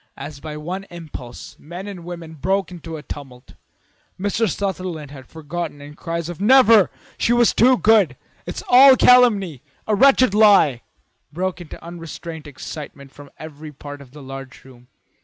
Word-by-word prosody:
As 145 -1 -8
by 150 0 -7
one 180 +6 -6
impulse 155 -9 -10
men 175 +5 -9
and 195 -4 -8
women 170 -2 -8
broke 190 +5 -1
into 165 -2 -8
a 150 - -10
tumult. 130 -4 -10 0.7
Mr. 205 +3 0
Sutherland 185 -6 -4
was 135 -3 -11
forgotten 160 -1 -6
and 145 +1 -12
cries 165 0 -4
of 175 +1 -8
"Never! 230 -3 +6 0.3
She 235 - +2
was 240 -1 +3
too 255 +2 +4
good! 205 - +3 0.3
It's 175 - -6
all 260 +2 +8
calumny! 205 - +4 0.2
A 215 - 0
wretched 255 -1 +4
lie!" 200 - +5 0.5
broke 180 +2 -3
in 165 - -11
unrestrained 165 -1 -9
excitement 140 -1 -9
from 145 0 -14
every 155 0 -10
part 145 0 -10
of 135 - -14
the 145 +2 -13
large 135 -1 -10
room. 125 -2 -17
170 Hz, 160 wpm, -20 LUFS, 145-195 Hz, 0.7 s, all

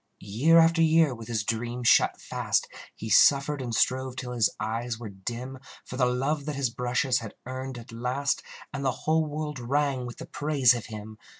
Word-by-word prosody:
Year 130 +12 +3
after 165 0 +5
year, 160 -3 +4
with 115 -2 -9
his 115 -3 -1
dream 120 +3 -3
shut 120 - +4
fast, - - -1 0.3
He 110 - -7
suffered 140 +6 +4
and 125 -2 -4
strove 130 +2 +1
till 125 -1 -5
his 120 -3 +2
eyes 115 +2 -3
were 115 -2 -7
dim, 120 +7 -6 0.3
For - - -8
the 125 -1 +2
love 140 +4 -1
that 150 -1 -3
his 135 -4 -1
brushes 125 +2 0
had 110 -2 -9
earned 130 0 -5
at 115 0 -11
last, 125 +5 -1 0.3
And 140 -1 -4
the 135 - +2 0.2
whole 160 +1 +3
world 150 -1 -4
rang 135 0 0
with 120 - -9
the 165 - -8
praise 145 -5 +3
of 120 -2 -5
him. 110 0 -9
125 Hz, 195 wpm, -27 LUFS, 120-140 Hz, 0.3 s, after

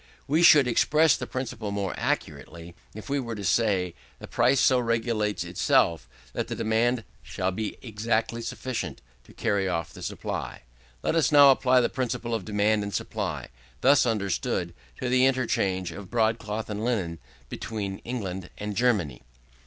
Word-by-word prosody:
We 155 +4 +2
should 150 -6 +7
express 150 +5 +4
the - - -5
principle 115 -5 -4
more 100 -2 -2
accurately, 85 0 -4 0.2
if 110 - -9
we 140 0 0
were 115 -3 -4
to 100 - -6
say, 95 -2 +1 0.2
the - - -9
price 125 +3 +3
so 130 -1 +4
regulates 115 -3 0
itself 80 -7 +1 0.2
that - - -2
the - - -4
demand 115 +2 +1 0.2
shall 95 -1 -2
be 105 +3 -4
exactly 115 0 -1
sufficient 115 - -5 0.2
to - - -17
carry 100 -4 0
off 85 -2 -2
the - - -11
supply. - - -5 0.4
Let - - +1
us 160 -2 +2
now 145 -2 +8
apply 130 -1 +4
the 120 - +2
principle 120 -2 -3
of 110 -4 -2
demand 105 0 +1
and 100 0 -4
supply, - - -3 0.3
thus 135 -1 +5
understood, 100 -5 -1 0.3
to 130 - -2
the 130 +1 +4
interchange 100 -8 0
of 100 -2 -9
broadcloth 110 -1 0
and 105 0 -4
linen 95 -9 -1 0.3
between 100 - -5
England 95 -7 -5
and 105 0 -4
Germany. 100 - +1
110 Hz, 160 wpm, -26 LUFS, 100-125 Hz, 0.4 s, now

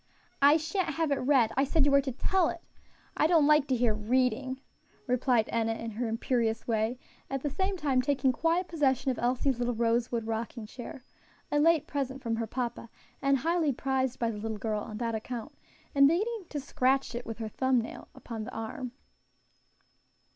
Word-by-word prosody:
"I 285 +3 +7
sha'n't 320 0 -2
have 320 -2 0
it 280 - +2
read! 250 -4 +3
I 270 - +3
said 285 +1 +2
you 290 - +3
were 280 0 +6
to 270 -1 -3
tell 345 +7 +1
it. 340 - -6 0.5
I 305 - +3
don't 325 -3 +5
like 300 -1 +5
to 260 - +2
hear 235 -2 +2
reading," 255 +4 0 0.5
replied 250 -3 +2
Enna 225 -1 0
in 230 0 -5
her 230 +3 -2
imperious 225 0 -1
way, 225 +1 0 0.3
at 270 -1 -3
the 290 - -1
same 380 +5 -1
time 275 -6 +2
taking 265 0 +2
quiet 335 +6 +1
possession 270 -5 +1
of 250 - -4
Elsie's 250 +1 +1
little 245 -1 0
rosewood 230 0 0
rocking 225 +1 -4
chair 245 +3 -9 0.5
a 295 - +3
late 325 0 +4
present 270 -2 -3
from 230 -1 -1
her 225 -1 -2
papa, 240 -1 -4 0.3
and 275 0 +3
highly 330 +1 +1
prized 265 0 -1
by 230 -1 0
the 210 - -6
little 220 0 -3
girl 215 -1 -2
on 210 +1 -7
that 230 0 -2
account 225 +1 -5 0.4
and 275 0 +7
beginning 410 +6 0
to 295 - -3
scratch 265 -2 0
with 225 -2 -6
her 225 -1 -4
thumb 260 +3 +2
nail 230 - -7
upon 225 -2 -6
the - - -7
arm. 240 +3 -5
255 Hz, 190 wpm, -29 LUFS, 230-285 Hz, 0.5 s, I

